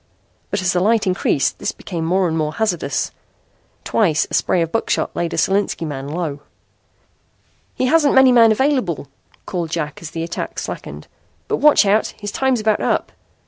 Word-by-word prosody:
But 190 - -2
as 175 - +1
the 180 - +2
light 215 +3 +2
increased 180 -7 0
this - - -2
became 170 -4 -6
more 185 +2 +2
and 160 - -2
more 155 -1 -1
hazardous. 175 -10 -1 0.7
Twice 160 -8 +2
a - - -9
spray 175 - +2
of 165 - -5
buckshot 225 - -1
laid 170 0 -2
a - - -4
Solinski 195 -3 0
man 140 -3 -5
low. 150 -2 -3 1.4
"He - - 0
hasn't 295 +1 +3
many 265 -1 +7
men 230 -2 +6
available," 220 - 0 0.4
called 175 -4 -3
Jack 155 -3 -4
as 165 - -7
the 165 +1 -4
attack 165 - -5
slackened. - - -6 0.4
"But - - 0
watch 300 -7 +5
out. 205 +2 +1
His 205 -1 -5
time's 265 +1 +1
about 215 -1 +1
up. - - -1
185 Hz, 175 wpm, -19 LUFS, 165-220 Hz, 1.4 s, many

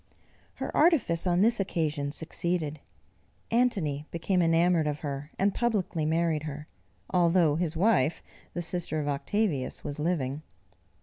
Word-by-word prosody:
Her - - -5
artifice 265 - +3
on 175 +1 +3
this 230 +2 +3
occasion 155 -6 -1
succeeded; 160 -1 -2 0.7
Antony 185 - +1
became 180 +2 0
enamoured 165 -1 +3
of 150 0 -3
her, 145 0 -4
and 195 0 +2
publicly 195 -9 0
married 165 -1 +1
her, 150 0 -7 0.4
although 170 -3 +3
his 165 -1 -1
wife 170 -6 +2 0.3
the 175 - -2
sister 170 -2 -2
of 145 - -3
Octavius 145 0 -1
was 145 0 -5
living. 150 -4 -1
165 Hz, 130 wpm, -28 LUFS, 150-180 Hz, 0.7 s, artifice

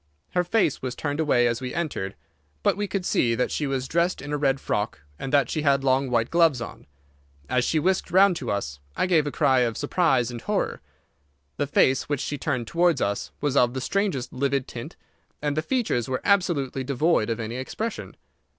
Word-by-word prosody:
Her 180 - +2
face 175 - +1
was 130 -1 -4
turned 145 +2 -3
away 135 -6 +3
as 120 0 0
we 125 -1 -5
entered, 150 - -3 0.5
but - - +3
we 205 0 -2
could 190 -1 -3
see 115 -1 +2
that 125 - 0
she 150 - -1
was 135 -1 -2
dressed 170 +4 +1
in 145 +2 -6
a - - +1
red 135 -2 +2
frock, - - -2 0.2
and 135 - -4
that 140 -4 +4
she 155 - -2
had 140 -2 +2
long 130 0 +2
white 115 -2 +1
gloves 165 -6 +4
on. 115 - -8 0.6
As 125 - +1
she 160 - +1
whisked 185 +5 +1
round 190 0 +5
to 125 - -5
us, 70 -9 -3 0.2
I - - +2
gave 165 -5 +3
a - - -2
cry 135 -4 +3
of 120 -3 0
surprise 135 -9 +1
and 120 -1 -7
horror. - - -1 0.8
The 145 - 0
face 135 -1 +2
which 145 -3 0
she 145 - -3
turned 130 -5 -1
towards 170 +2 +2
us 100 -2 -2
was 145 -2 0
of 125 -1 +3
the - - -1
strangest 175 -4 -1
livid 135 0 0
tint, 115 - -8 0.4
and 145 -1 -1
the 155 - +1
features 185 - -1
were 130 - -1
absolutely 170 -10 +1
devoid 140 -2 +1
of 115 0 -2
any 115 +2 -4
expression. 215 - -5
140 Hz, 205 wpm, -25 LUFS, 125-165 Hz, 0.8 s, round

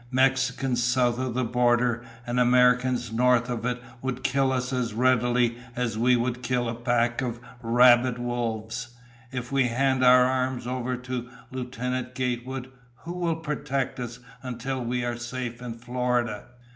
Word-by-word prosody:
Mexicans 130 -1 +1
south 125 0 +2
of 130 -2 -2
the 130 - +1
border 120 0 +2 0.2
and 120 +1 -1
Americans 125 -1 +3
north 125 +1 +3
of 115 -2 -3
it 125 0 -1 0.2
would 130 -1 -3
kill 135 +1 +2
us 130 0 -1
as 120 -4 -1
readily 120 -1 +2 0.2
as 120 -3 -1
we 125 +3 +4
would 120 +1 -1
kill 125 -1 0
a 115 - -2
pack 120 +1 0
of 120 -2 -3 0.2
rabid 120 +1 +5
wolves. 120 -1 -3 0.4
If 125 -1 -5
we 135 -2 +3
hand 130 +2 +1
our 125 0 +7
arms 130 -1 -1
over 125 0 -2
to 125 -1 -5 0.2
Lieutenant 125 0 -4
Gatewood, 125 +1 -3 0.3
who 170 - -5
will 175 -2 0
protect 145 -5 -3
us 120 -1 -5 0.2
until 130 +1 -4
we 120 +1 -1
are 120 0 -2
safe 120 0 -5
in 120 -2 -5
Florida?" 120 -2 -1
125 Hz, 155 wpm, -26 LUFS, 120-130 Hz, 0.4 s, our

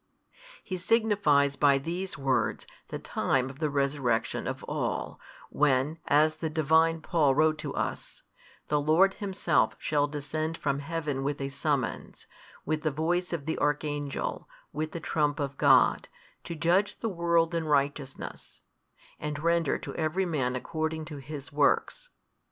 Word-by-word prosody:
He 185 - -4
signifies 180 -9 +3
by 140 -1 +4
these 175 +6 -4
words 135 -2 0 0.2
the - - -5
time 130 0 0
of 135 - -15
the 155 -2 0
resurrection 140 -4 0
of - - -4
all, - - -3 0.3
when, 145 +2 +2
as 155 +2 +4
the 160 0 -2
Divine 160 +1 +3
Paul 150 -5 +2
wrote 155 +1 +3
to 150 -2 -5
us, - - -4 0.5
The 150 -1 +2
Lord 170 +6 +4
Himself 200 -2 0
shall 145 -1 +1
descend 155 +2 -3
from 140 -1 -1
heaven 145 -2 -3
with 145 +1 -2
a 135 0 -3
summons, 140 -3 -2 0.4
with 155 0 -1
the 155 - +1
voice 170 +5 -1
of 165 -5 -3
the 160 - -2
Archangel, 145 -1 -2 0.2
with 155 +1 -3
the 170 - -5
trump 150 -2 0
of 140 -1 -2
God, 135 -4 +5 0.4
to 170 - -5
judge 175 +5 +1
the 230 - -1
world 170 -3 +1
in 165 -1 -1
righteousness, 140 -2 -2 0.6
and 150 -1 -3
render 170 -1 +1
to - - -7
every 165 +4 0
man 135 -7 -1
according 160 +4 -3
to 150 -1 -8
his 140 -1 -8
works. 150 - +1
150 Hz, 150 wpm, -28 LUFS, 140-165 Hz, 0.6 s, God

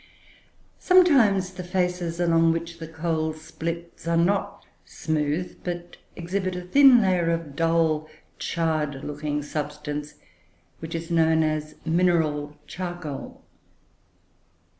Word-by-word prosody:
Sometimes 245 - +4
the 180 0 -7
faces 180 -2 -1
along 165 -1 +4
which 170 0 -5
the 160 - -6
coal 160 -1 -2
splits 165 +2 -6
are 170 0 +2
not 200 +3 0 0.2
smooth, 155 +2 -2
but 175 -1 -5 0.2
exhibit 185 +2 -2
a 180 - -5
thin 250 +4 +6
layer 180 -3 +2
of 165 -4 -2
dull, 165 -1 +1 0.3
charred 155 -4 -1
looking 150 0 -3
substance, 150 0 -5 0.6
which 160 +1 -6
is 165 +1 -5
known 160 -1 +3
as 155 0 -2
"mineral 160 -4 +1
charcoal." 175 -5 -6
165 Hz, 110 wpm, -25 LUFS, 155-180 Hz, 0.6 s, thin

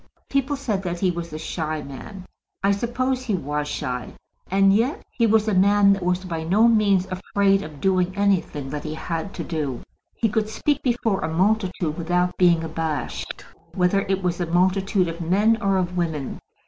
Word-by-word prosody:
People 275 +1 +1
said 225 -8 -2
that 175 -2 -4
he 185 -1 +2
was 170 -1 -6
a 155 - -5
shy 155 -1 -3
man. 180 +8 -9 0.4
I 200 - +4
suppose 250 +5 -1
he 235 -6 -1
was 150 -2 -2
shy, 125 -4 -4 0.4
and 195 +1 +4
yet 235 +8 +1
he 230 -3 +2
was 220 0 +3
a 215 - +1
man 200 +1 +5
that 195 - -3
was 180 +1 0
by 165 -3 -3
no 205 +8 +4
means 205 -5 +3
afraid 195 +1 +1
of 155 -4 -9
doing 185 0 +2
anything 180 -9 0
that 150 0 -4
he 155 0 -4
had 165 +3 -4
to 170 - -4
do. 150 -8 -3 0.3
He 230 - +1
could 215 0 -1
speak 290 +6 0
before 235 -5 0
a 160 - -2
multitude 180 -3 0
without 180 +2 0
being 170 -2 +4
abashed, 160 -1 -4 0.3
whether 180 +2 +2
it 190 -1 0
was 180 0 -1
a 175 - -1
multitude 185 +2 +2
of 165 +1 -5
men 210 +7 +2
or 195 -2 +2
of 180 -1 -1
women. 160 -6 -2
185 Hz, 185 wpm, -23 LUFS, 165-205 Hz, 0.4 s, man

